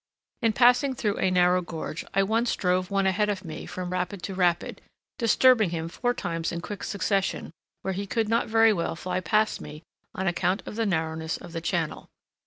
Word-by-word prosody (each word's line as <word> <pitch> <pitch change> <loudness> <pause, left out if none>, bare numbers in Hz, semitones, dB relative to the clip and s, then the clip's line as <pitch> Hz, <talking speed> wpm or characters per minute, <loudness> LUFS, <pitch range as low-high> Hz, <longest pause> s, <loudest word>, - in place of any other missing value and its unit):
In 225 -2 +2
passing 250 +3 +4
through 210 -4 -1
a 190 - +2
narrow 180 0 +3
gorge, 165 -2 -5
I 195 - +4
once 225 +4 +1
drove 185 -2 0
one 195 -1 +1
ahead 205 +2 +2
of 195 -2 -3
me 155 -2 -7
from 180 -1 -5
rapid 180 0 -3
to 190 - -4
rapid, 175 -2 0 0.4
disturbing 230 -2 +5
him 165 -1 -3
four 245 +7 -1
times 165 -1 -3
in 170 - -3
quick 205 +4 -7
succession 200 -3 -1 0.3
where 190 - -1
he 200 +2 -4
could 225 +1 0
not 230 +2 +1
very 225 0 +5
well 170 -3 -2
fly 180 +2 -2
past 215 +3 +1
me 150 +2 -9 0.3
on 190 - -2
account 180 +2 0
of - - -7
the 225 -1 0
narrowness 160 -2 -1
of 170 - -11
the 165 - -3
channel. 165 -2 -2
190 Hz, 195 wpm, -26 LUFS, 175-215 Hz, 0.4 s, disturbing